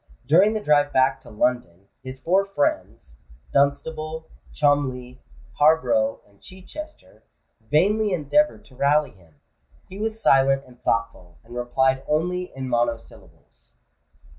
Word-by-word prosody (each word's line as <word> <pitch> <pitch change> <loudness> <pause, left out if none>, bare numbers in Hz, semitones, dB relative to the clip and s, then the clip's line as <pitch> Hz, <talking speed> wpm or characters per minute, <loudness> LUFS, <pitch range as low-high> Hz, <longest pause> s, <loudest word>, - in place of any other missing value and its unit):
During 180 - +4
the 215 - -1
drive 145 -6 +2
back 130 +1 +2
to - - -16
London, 105 -5 -2
his 130 0 -9
four 185 +8 +2
friends—Dunstable, 140 - -3 0.2
Cholmondeley, 130 - -1 0.4
Harborough, 275 - +2
and 100 -1 -28
Chichester—vainly 205 - -4
endeavoured 185 - +1
to 130 - -19
rally 145 +3 +2
him: 85 -5 -24 0.5
he 190 - -10
was 220 +1 -3
silent 135 -6 +3
and 125 -1 -19
thoughtful, 115 -6 -2
and 120 +1 -13
replied 130 +2 0
only 180 +4 -1
in 130 -1 -5
monosyllables. 120 -2 -5
140 Hz, 115 wpm, -23 LUFS, 120-180 Hz, 0.5 s, During